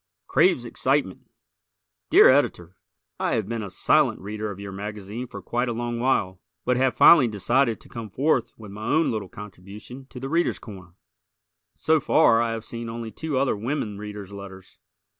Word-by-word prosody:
"Craves 175 Hz, -10 st, +2 dB
Excitement" 130 Hz, -4 st, -1 dB, 0.8 s
Dear -, -, +8 dB
Editor: 95 Hz, -, +2 dB, 0.4 s
I -, -, 0 dB
have 110 Hz, -4 st, -1 dB
been 115 Hz, 0 st, -3 dB
a 100 Hz, -, -6 dB
silent 90 Hz, -, +2 dB
Reader 105 Hz, +2 st, -5 dB
of 100 Hz, -2 st, -8 dB
your 100 Hz, -1 st, -7 dB
magazine 105 Hz, +4 st, -6 dB
for -, -, -10 dB
quite 120 Hz, +1 st, -1 dB
a -, -, -1 dB
long 120 Hz, 0 st, -3 dB
while, 100 Hz, -8 st, 0 dB, 0.2 s
but 125 Hz, -, +2 dB
have 130 Hz, +1 st, +1 dB
finally 150 Hz, -8 st, +7 dB
decided 115 Hz, +3 st, +1 dB
to -, -, -16 dB
come 115 Hz, -2 st, -8 dB
forth 135 Hz, +3 st, +1 dB
with 105 Hz, -3 st, -11 dB
my 105 Hz, +2 st, -8 dB
own 160 Hz, +2 st, +2 dB
little 105 Hz, -5 st, -4 dB
contribution 105 Hz, +7 st, -11 dB
to 130 Hz, -, -10 dB
"The 135 Hz, -, -5 dB
Readers' 170 Hz, +4 st, +1 dB
Corner." 95 Hz, -5 st, -12 dB, 0.8 s
So 160 Hz, 0 st, +2 dB
far 135 Hz, -5 st, +4 dB
I 115 Hz, -1 st, 0 dB
have 115 Hz, -1 st, -6 dB
seen 115 Hz, 0 st, -6 dB
only 115 Hz, -1 st, -6 dB
two 155 Hz, 0 st, -3 dB
other 135 Hz, -3 st, +1 dB
women 110 Hz, -2 st, -3 dB
Readers' 105 Hz, -2 st, -8 dB
letters. 95 Hz, -1 st, -11 dB
115 Hz, 180 wpm, -24 LUFS, 100-130 Hz, 0.8 s, Dear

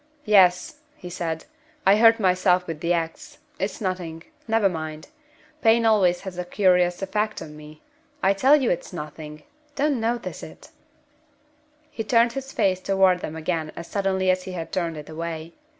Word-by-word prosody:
"Yes," 185 Hz, -4 st, +4 dB, 0.2 s
he 180 Hz, -, -10 dB
said; 165 Hz, -2 st, -4 dB, 0.4 s
"I 200 Hz, +2 st, +6 dB
hurt 225 Hz, 0 st, +6 dB
myself 185 Hz, -2 st, +2 dB
with 165 Hz, -3 st, -6 dB
the 170 Hz, +2 st, -1 dB
ax. 165 Hz, -1 st, -3 dB, 0.2 s
It's 195 Hz, +1 st, -3 dB
nothing. 180 Hz, -5 st, -4 dB, 0.2 s
Never 225 Hz, -2 st, +3 dB
mind. 155 Hz, -3 st, -6 dB, 0.5 s
Pain 230 Hz, +1 st, +4 dB
always 190 Hz, -5 st, +3 dB
has 190 Hz, -2 st, -7 dB
a -, -, -1 dB
curious 180 Hz, -1 st, +2 dB
effect 210 Hz, +2 st, -1 dB
on 150 Hz, -1 st, -9 dB
me. 150 Hz, 0 st, -13 dB, 0.4 s
I 195 Hz, +1 st, +4 dB
tell 260 Hz, +9 st, +5 dB
you 270 Hz, -5 st, +1 dB
it's 175 Hz, -, -3 dB
nothing! 150 Hz, -2 st, -8 dB, 0.3 s
Don't 285 Hz, -2 st, +1 dB
notice 235 Hz, +1 st, -3 dB
it!" -, -, -12 dB, 1.2 s
He 225 Hz, -, -4 dB
turned 230 Hz, +2 st, +3 dB
his 270 Hz, +1 st, -6 dB
face 190 Hz, -6 st, +1 dB
toward 190 Hz, -1 st, +3 dB
them 160 Hz, -, -6 dB
again 160 Hz, -1 st, -3 dB
as 170 Hz, -, -7 dB
suddenly 190 Hz, -1 st, 0 dB
as 185 Hz, 0 st, -1 dB
he 185 Hz, -, -6 dB
had 165 Hz, -2 st, -6 dB
turned 170 Hz, -3 st, -2 dB
it 150 Hz, -, -9 dB
away. 165 Hz, 0 st, -6 dB
185 Hz, 165 wpm, -24 LUFS, 165-210 Hz, 1.2 s, I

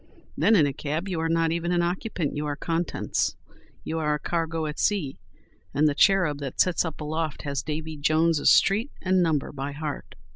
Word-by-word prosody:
Then, 225 Hz, -, +4 dB
in 160 Hz, -7 st, +5 dB
a 140 Hz, -, -1 dB
cab, 155 Hz, +6 st, -3 dB
you 180 Hz, -4 st, -2 dB
are 165 Hz, 0 st, 0 dB
not 165 Hz, 0 st, +2 dB
even 170 Hz, +1 st, -1 dB
an 175 Hz, -1 st, +2 dB
occupant; 175 Hz, -2 st, -2 dB
you 150 Hz, +1 st, -2 dB
are 145 Hz, -, -2 dB
contents. 165 Hz, +3 st, -1 dB, 0.5 s
You 160 Hz, -, -3 dB
are 150 Hz, -1 st, +1 dB
a -, -, -5 dB
cargo 165 Hz, 0 st, -2 dB
at 150 Hz, 0 st, -5 dB
sea, 175 Hz, -10 st, 0 dB, 0.6 s
and 150 Hz, +2 st, +4 dB
the 150 Hz, -, +2 dB
"cherub 170 Hz, -3 st, +3 dB
that 140 Hz, -3 st, -6 dB
sits 180 Hz, -2 st, +3 dB
up 160 Hz, -2 st, -6 dB
aloft" 155 Hz, 0 st, -3 dB
has 140 Hz, -2 st, -2 dB
Davy 155 Hz, +1 st, -5 dB
Jones's 155 Hz, +1 st, +3 dB
street 215 Hz, +7 st, +4 dB
and 185 Hz, 0 st, +3 dB
number 160 Hz, -5 st, 0 dB
by 140 Hz, 0 st, -5 dB
heart. 150 Hz, 0 st, -6 dB
160 Hz, 195 wpm, -26 LUFS, 150-170 Hz, 0.6 s, in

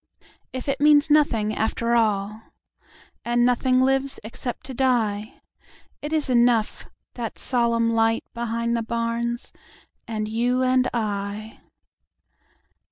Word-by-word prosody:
If 255 Hz, +1 st, -6 dB
it 275 Hz, 0 st, -1 dB
means 295 Hz, 0 st, +5 dB
nothing 225 Hz, -8 st, +3 dB
after 230 Hz, +2 st, 0 dB
all! 215 Hz, -2 st, +1 dB, 0.8 s
And 240 Hz, 0 st, +2 dB
nothing 255 Hz, +1 st, +2 dB
lives 270 Hz, +1 st, +1 dB
except 235 Hz, +3 st, -6 dB
to 265 Hz, -, -7 dB
die—It 235 Hz, +3 st, -3 dB
is 310 Hz, -2 st, 0 dB
enough—that 235 Hz, -1 st, -1 dB
solemn 235 Hz, -2 st, +1 dB
lightBehind 230 Hz, +1 st, 0 dB
the 235 Hz, -, 0 dB
barns, 235 Hz, +1 st, -3 dB, 0.5 s
and 215 Hz, -2 st, -3 dB
you 245 Hz, +4 st, 0 dB
and 255 Hz, 0 st, +2 dB
I. 210 Hz, -1 st, -4 dB
235 Hz, 100 wpm, -24 LUFS, 225-255 Hz, 0.8 s, means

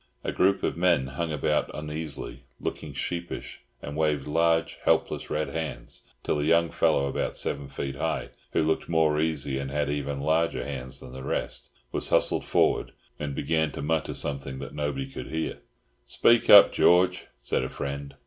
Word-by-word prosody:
A -, -, -1 dB
group 95 Hz, +1 st, +2 dB
of -, -, 0 dB
men 85 Hz, -6 st, +3 dB
hung 80 Hz, +5 st, -3 dB
about 75 Hz, -3 st, 0 dB
uneasily, 75 Hz, 0 st, -5 dB, 0.2 s
looked -, -, -4 dB
sheepish, 85 Hz, 0 st, -4 dB, 0.2 s
and 70 Hz, -, -6 dB
waved 75 Hz, -3 st, +1 dB
large, 80 Hz, +1 st, +1 dB
helpless -, -, +1 dB
red 75 Hz, +1 st, -1 dB
hands, 80 Hz, -7 st, -5 dB, 0.2 s
till 75 Hz, -, 0 dB
a -, -, 0 dB
young 85 Hz, +1 st, +3 dB
fellow 70 Hz, -, +2 dB
about 70 Hz, -, -2 dB
seven 70 Hz, -1 st, -1 dB
feet 70 Hz, 0 st, -5 dB
high—who 80 Hz, 0 st, -2 dB
looked 80 Hz, +1 st, 0 dB
more 80 Hz, -2 st, +3 dB
uneasy 75 Hz, -4 st, -1 dB
and 70 Hz, -1 st, -4 dB
had 70 Hz, 0 st, -1 dB
even 70 Hz, -1 st, -2 dB
larger 80 Hz, +3 st, +1 dB
hands 65 Hz, -1 st, -5 dB
than 65 Hz, -, -10 dB
the 65 Hz, -, -7 dB
rest—was -, -, -3 dB
hustled -, -, +2 dB
forward, -, -, +2 dB, 0.3 s
and 70 Hz, -2 st, -3 dB
began 80 Hz, -2 st, 0 dB
to -, -, -5 dB
mutter 80 Hz, +1 st, 0 dB
something 70 Hz, -2 st, -2 dB
that 70 Hz, -, -7 dB
nobody 70 Hz, -2 st, -2 dB
could 65 Hz, -, -7 dB
hear. 80 Hz, 0 st, -3 dB, 0.4 s
"Speak 115 Hz, -, +3 dB
up, 100 Hz, -, +10 dB
George," 90 Hz, +1 st, +4 dB
said -, -, -1 dB
a 65 Hz, -, -3 dB
friend. 70 Hz, 0 st, -5 dB
75 Hz, 165 wpm, -27 LUFS, 70-80 Hz, 0.4 s, up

